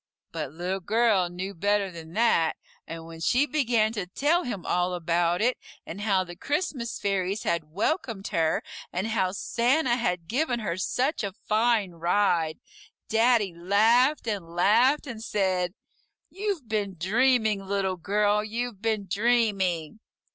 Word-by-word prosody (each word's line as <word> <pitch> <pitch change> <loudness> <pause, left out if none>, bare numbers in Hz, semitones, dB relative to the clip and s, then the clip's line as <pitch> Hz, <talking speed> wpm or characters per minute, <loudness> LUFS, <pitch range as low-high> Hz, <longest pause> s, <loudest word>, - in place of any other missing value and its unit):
But - - -4
Little 180 +4 -3
Girl 205 -2 +2
knew 185 +3 -5
better 200 +2 0
than 165 -1 -10
that, 215 -8 +2 0.3
and 165 0 -7
when 165 0 -10
she 250 - +3
began 240 -7 +1
to 200 -5 -4
tell 300 - +1
him 205 -8 -5
all 180 0 0
about 175 +2 +1
it, 250 +2 +1 0.3
and 190 +5 -7
how 195 -3 +2
the 175 -1 -10
Christmas 280 - -2
fairies 195 +1 -1
had 170 -2 0
welcomed 215 - -2
her, 160 -1 +1 0.3
and 185 +3 -2
how 190 -5 +1
Santa 240 +6 +1
had 180 -8 -1
given 250 - 0
her 200 -5 -2
such 255 - -1
a 200 -2 -3
fine 220 -3 +2
ride, 170 -1 +1 0.5
Daddy 225 -4 +3
laughed 225 - +3
and 200 -7 -3
laughed, 235 +12 +4
and 230 -5 -7
said, 185 -4 0 0.6
"You've 390 - -3
been 205 -3 -2
dreaming, 220 +1 +2
Little 195 -2 -1
Girl, 205 +3 +1
you've 225 -1 -4
been 220 -3 -1
dreaming." 200 -5 +1
205 Hz, 145 wpm, -26 LUFS, 180-235 Hz, 0.6 s, laughed